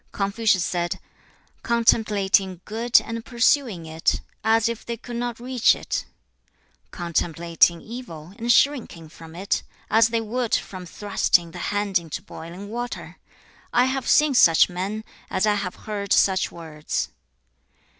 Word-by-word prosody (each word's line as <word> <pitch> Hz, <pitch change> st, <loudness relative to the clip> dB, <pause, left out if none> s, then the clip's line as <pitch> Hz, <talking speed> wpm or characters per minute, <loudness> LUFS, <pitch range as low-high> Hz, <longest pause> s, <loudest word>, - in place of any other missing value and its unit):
Confucius 200 Hz, -2 st, +1 dB
said, 175 Hz, -1 st, -2 dB, 0.6 s
'Contemplating 200 Hz, -5 st, +2 dB
good, 230 Hz, +3 st, +3 dB
and 230 Hz, 0 st, -6 dB
pursuing 235 Hz, -, +1 dB
it, 160 Hz, 0 st, 0 dB, 0.2 s
as 225 Hz, 0 st, +3 dB
if 235 Hz, -1 st, -4 dB
they 235 Hz, 0 st, -5 dB
could 240 Hz, +1 st, -7 dB
not 240 Hz, -1 st, -3 dB
reach 250 Hz, -1 st, +3 dB
it; -, -, -4 dB, 0.8 s
contemplating 170 Hz, -1 st, +1 dB
evil, 190 Hz, -9 st, -9 dB
and 235 Hz, +1 st, +1 dB
shrinking 240 Hz, -, +1 dB
from 165 Hz, 0 st, -13 dB
it, 195 Hz, +3 st, -1 dB, 0.3 s
as 225 Hz, +1 st, +6 dB
they 230 Hz, 0 st, 0 dB
would 230 Hz, +1 st, -1 dB
from 185 Hz, -2 st, -5 dB
thrusting 175 Hz, -2 st, +1 dB
the 180 Hz, -, -9 dB
hand 205 Hz, -2 st, +1 dB
into 165 Hz, -3 st, -7 dB
boiling 170 Hz, +5 st, -9 dB
water: 240 Hz, +2 st, -6 dB, 0.5 s
I 245 Hz, -, +4 dB
have 260 Hz, 0 st, -2 dB
seen 300 Hz, -1 st, +5 dB
such 165 Hz, -10 st, +6 dB
men, 195 Hz, +5 st, -4 dB, 0.3 s
as 190 Hz, -, +1 dB
I 210 Hz, -, +3 dB
have 200 Hz, -3 st, -3 dB
heard 200 Hz, -2 st, -1 dB
such 190 Hz, -1 st, +3 dB
words. 155 Hz, -3 st, -4 dB
205 Hz, 135 wpm, -24 LUFS, 175-235 Hz, 0.8 s, as